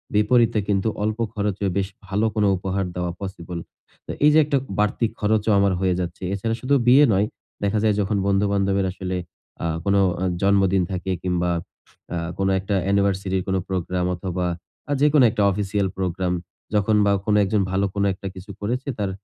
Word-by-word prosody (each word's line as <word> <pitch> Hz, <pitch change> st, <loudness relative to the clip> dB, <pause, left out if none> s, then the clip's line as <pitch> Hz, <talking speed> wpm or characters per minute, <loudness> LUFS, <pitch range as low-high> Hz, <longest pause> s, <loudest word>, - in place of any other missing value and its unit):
বিপরীতে 115 Hz, +1 st, +3 dB
কিন্তু 100 Hz, 0 st, +1 dB, 0.2 s
অল্প 110 Hz, +1 st, -1 dB
খরচে 100 Hz, -1 st, -2 dB
বেশ 95 Hz, -1 st, 0 dB, 0.2 s
ভালো 100 Hz, +4 st, 0 dB
কোনো 105 Hz, -1 st, +3 dB
উপহার 95 Hz, +1 st, -2 dB
দেওয়া 90 Hz, -1 st, -2 dB
পসিবল। 90 Hz, -3 st, -6 dB, 0.5 s
তো -, -, -5 dB
এইযে 150 Hz, +1 st, +6 dB
একটা 145 Hz, -1 st, +1 dB, 0.2 s
বাড়তি 105 Hz, +3 st, +1 dB
খরচও 110 Hz, 0 st, +1 dB
আমার 100 Hz, -1 st, +3 dB
হয়ে 95 Hz, -1 st, +2 dB
যাচ্ছে। 90 Hz, +1 st, -5 dB
এছাড়া 110 Hz, +3 st, -1 dB
শুধু 140 Hz, +2 st, +2 dB
বিয়ে 135 Hz, +4 st, +7 dB
নয়, 100 Hz, +2 st, +3 dB, 0.4 s
দেখা 100 Hz, +1 st, +1 dB
যায় 105 Hz, -2 st, +3 dB
যখন 100 Hz, +1 st, 0 dB
বন্ধু-বান্ধবের 100 Hz, -1 st, +1 dB
আসলে 95 Hz, -1 st, -4 dB, 0.5 s
আ -, -, -1 dB, 0.2 s
কোন 100 Hz, 0 st, +2 dB
আ -, -, +4 dB, 0.4 s
জন্মদিন 95 Hz, -1 st, +3 dB
থাকে 95 Hz, 0 st, -3 dB
কিংবা 90 Hz, -1 st, 0 dB, 0.6 s
আ -, -, -1 dB, 0.2 s
কোন 95 Hz, -, 0 dB
একটা 100 Hz, +2 st, -2 dB
অ্যানিভার্সারির 95 Hz, -1 st, +1 dB
কোন 95 Hz, -, 0 dB
একটা 90 Hz, -, -9 dB
প্রোগ্রাম 90 Hz, -1 st, -1 dB
অথবা, 90 Hz, 0 st, -3 dB, 0.4 s
আ -, -, -2 dB
যেকোনো 150 Hz, -2 st, +5 dB
একটা 105 Hz, -, -1 dB
অফিসিয়াল 100 Hz, 0 st, -1 dB
প্রোগ্রাম 90 Hz, -1 st, -1 dB, 0.4 s
যখন 105 Hz, +1 st, +3 dB
বা, 100 Hz, -, +3 dB
কোন 105 Hz, -, +2 dB
একজন 100 Hz, +1 st, +1 dB
ভালো 95 Hz, +1 st, +1 dB
কোন 100 Hz, -, +1 dB
একটা 95 Hz, +1 st, -7 dB
কিছু 95 Hz, +2 st, -9 dB
করেছে, 125 Hz, +7 st, -2 dB
তার 100 Hz, -2 st, 0 dB
100 Hz, 175 wpm, -23 LUFS, 95-105 Hz, 0.6 s, বিয়ে